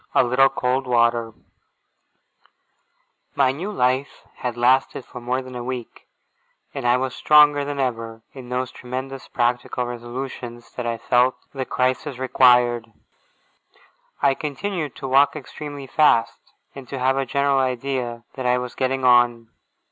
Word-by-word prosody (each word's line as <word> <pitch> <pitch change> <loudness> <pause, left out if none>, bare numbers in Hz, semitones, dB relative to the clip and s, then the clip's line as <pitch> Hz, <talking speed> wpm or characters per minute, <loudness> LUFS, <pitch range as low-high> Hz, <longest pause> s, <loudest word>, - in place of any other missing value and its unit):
A - - +6
LITTLE 130 +2 +4
COLD 130 0 -1
WATER 120 -1 +2 2.0
My 135 -2 +3
new 175 +10 -5
life 130 -4 -1
had 125 -1 -4
lasted 130 +1 +2
for 125 - -10
more 125 +2 -2
than 130 0 -10
a 120 - -5
week, 125 -2 -7 0.7
and 120 - -3
I 120 +1 +4
was 130 -1 -2
stronger 150 -1 +5
than 140 0 -4
ever 115 -3 -3
in 130 -3 -10
those 125 0 -2
tremendous 130 +2 -7
practical 120 +1 -1
resolutions 120 0 -7
that 125 -1 -5
I 115 0 -1
felt 125 +2 +2 0.2
the 135 -2 -3
crisis 130 +2 -1
required. 125 -2 +3 1.3
I 140 -1 +5
continued 155 +1 -4
to 135 - -6
walk 135 +3 +4
extremely 145 -1 -8
fast, 130 -5 +1 0.2
and 135 -2 -10
to 135 - -5
have 130 +1 +2
a 135 - 0
general 140 +1 +2
idea 125 -2 -2
that 130 -2 -3
I 125 0 +3
was 125 -1 -5
getting 130 0 -1
on. 120 -2 +4
130 Hz, 145 wpm, -22 LUFS, 120-135 Hz, 2.0 s, A